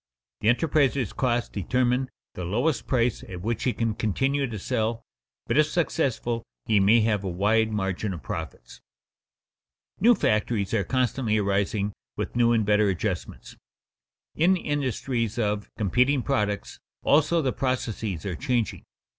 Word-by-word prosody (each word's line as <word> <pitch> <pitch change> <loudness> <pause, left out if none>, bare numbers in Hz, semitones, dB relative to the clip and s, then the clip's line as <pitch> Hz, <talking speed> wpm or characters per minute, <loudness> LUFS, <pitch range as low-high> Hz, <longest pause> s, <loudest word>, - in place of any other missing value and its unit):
_The 110 - +3
enterpriser's 140 - +2
costs 120 -2 0
determine 125 +5 0 0.2
the 90 - -6
lowest 120 - 0
price 120 -3 +1
at 90 -2 -7
which 115 +1 -2
he 125 - +2
can 115 -2 -1
continue 135 +7 0
to 115 -3 -5
sell, 110 +3 -1 0.4
but - - +2
if 155 - +5
successful 135 -8 -1 0.2
he 110 -2 +3
may 105 +4 +5
have 105 -2 +1
a 95 - -2
wide 110 +5 +2
margin 95 0 -2
of 85 -6 -7
profits._ 75 -7 -7 1.2
New 235 +4 +6
factories 105 - 0
are 105 -3 +2
constantly 125 -3 0
arising 100 0 0 0.2
with - - -4
new 120 -1 +4
and 110 -3 +2
better 105 0 +3
adjustments. 90 -5 -4 0.8
In 180 +4 +3
industries 130 - -2
of 105 -2 -1
competing 125 +6 +2
products, 105 -7 -1 0.2
also, 155 +3 +4
the 130 - 0
processes 115 - -2
are 95 -3 -2
changing. 125 -5 -1
115 Hz, 140 wpm, -26 LUFS, 105-130 Hz, 1.2 s, New